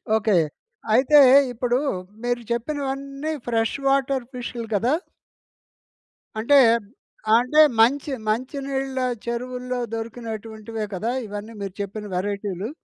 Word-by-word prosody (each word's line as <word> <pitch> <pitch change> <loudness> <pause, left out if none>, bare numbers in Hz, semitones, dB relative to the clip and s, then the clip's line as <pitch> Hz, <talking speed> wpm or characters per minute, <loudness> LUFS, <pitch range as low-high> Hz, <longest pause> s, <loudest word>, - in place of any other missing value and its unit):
Okay. 215 -3 +2 0.6
అయితే 270 +5 +6 0.3
ఇప్పుడు 245 +1 0 0.4
మీరు 245 0 -1
చెప్పినవన్నీ 275 +3 -3 0.2
ఫ్రెష్ 225 -1 +1
వాటర్ 270 -1 +2
ఫిష్‌లు 240 -2 -5
కదా! 235 +7 +2 1.4
అంటే, 260 +6 +4 0.8
అంటే 250 +6 +4 0.2
మంచి 275 +6 +3 0.2
మంచినీళ్ళ 270 +3 -2 0.3
చెరువుల్లో 250 +1 -3
దొరికినటువంటివే 225 -1 -5
కదా! 220 +6 -2 0.2
ఇవన్నీ 205 +2 -7
మీరు 195 -2 -5
చెప్పిన 200 +2 -5
వెరైటీలు. 200 +1 -3
240 Hz, 95 wpm, -23 LUFS, 220-265 Hz, 1.4 s, అయితే